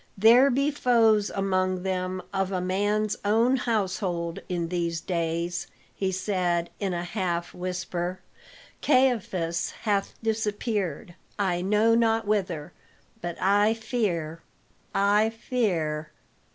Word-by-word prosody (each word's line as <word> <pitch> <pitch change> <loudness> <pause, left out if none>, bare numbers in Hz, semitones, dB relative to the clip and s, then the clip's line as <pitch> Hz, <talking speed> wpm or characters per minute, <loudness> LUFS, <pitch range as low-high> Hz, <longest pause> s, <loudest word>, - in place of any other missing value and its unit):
"There 235 +7 +7
be 275 +3 +1
foes 225 -6 +3
among 185 -2 0
them 185 -1 -2
of 195 0 0
a 185 - 0
man's 205 +3 0
own 225 +5 +3
household 185 -7 -1
in 170 -2 -2
these 170 -2 -1
days," 170 0 -2 0.3
he 190 -1 -1
said 180 -3 -1
in 195 -2 -1
a 175 -1 -2
half 175 -2 -2
whisper. 180 0 -3 0.6
"Caiaphas 215 - +1
hath 200 -3 0
disappeared, 210 - -2 0.2
I 185 -4 0
know 210 +4 +3
not 225 -1 +2
whither; 180 -7 -1 0.5
but 175 -1 -5
I 205 +3 +3
fear 195 -9 -2 0.5
I 205 +2 +4
fear." 180 - -1
190 Hz, 110 wpm, -26 LUFS, 175-220 Hz, 0.6 s, There